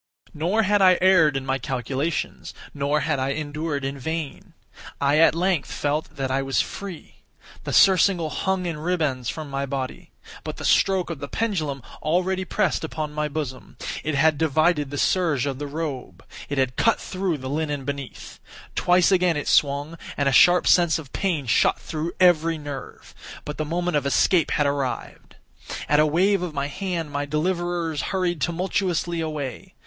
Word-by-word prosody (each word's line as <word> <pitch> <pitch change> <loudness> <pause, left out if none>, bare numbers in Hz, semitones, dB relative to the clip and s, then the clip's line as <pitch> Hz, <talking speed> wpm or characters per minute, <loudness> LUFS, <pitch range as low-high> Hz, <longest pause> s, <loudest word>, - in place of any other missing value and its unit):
Nor 180 +9 +1
had 205 0 +2
I 185 -2 +6
erred 170 -6 +5
in 135 - -5
my 135 0 -1
calculations—nor 140 +2 -3
had 150 -3 0
I 135 +1 0
endured 150 -1 -3
in 135 +1 -4
vain. 160 +1 -5 0.4
I 140 +2 +3
at 165 -1 +5
length 180 -3 0
felt 145 +2 -2
that 135 -1 -2
I 135 +1 +1
was 135 0 0
free. 195 -5 -5 0.5
The - - -3
surcingle 185 -4 +4
hung 190 +2 -1
in 165 -3 -3
ribands 150 -8 -1
from 155 -2 -5
my 135 0 -2
body. 130 -1 -5 0.3
But - - -6
the - - -6
stroke 190 -3 +2
of 160 - -6
the 140 - -5
pendulum 155 - -2 0.2
already 185 +4 0
pressed - - 0
upon 155 -1 -4
my 150 0 -1
bosom. 140 -3 -6 0.3
It 155 -1 -1
had 155 +1 +3
divided 155 -1 +2
the 145 - -5
serge 160 -6 +1
of 135 -2 -3
the 145 - -4
robe. 145 -3 -5 0.2
It 140 - -3
had 130 -2 0
cut 230 - +3
through 185 -4 -2
the 130 -1 -7
linen 145 -1 -2
beneath. 140 -2 -7 0.3
Twice 180 +1 +3
again 180 -4 +3
it 145 - -4
swung, 145 +3 +1 0.2
and 140 - +1
a - - +3
sharp 175 +7 +6
sense 175 -2 +4
of 150 -5 -10
pain 170 -8 -1
shot 115 - +3
through 160 +2 -4
every 165 -3 +4
nerve. 145 -3 -8 0.3
But 150 - -6
the 155 - -1
moment 175 +1 -1
of 140 -1 -1
escape 165 +4 +3
had 150 - +1
arrived. 140 -2 -3 0.5
At 150 - +3
a 155 - +5
wave 185 +5 +2
of 175 -4 -4
my 140 0 -1
hand 175 -4 -4
my 145 0 -2
deliverers 170 0 -1
hurried 180 -4 -1
tumultuously 175 -1 -1
away. 155 +3 -5
155 Hz, 175 wpm, -24 LUFS, 140-175 Hz, 0.5 s, I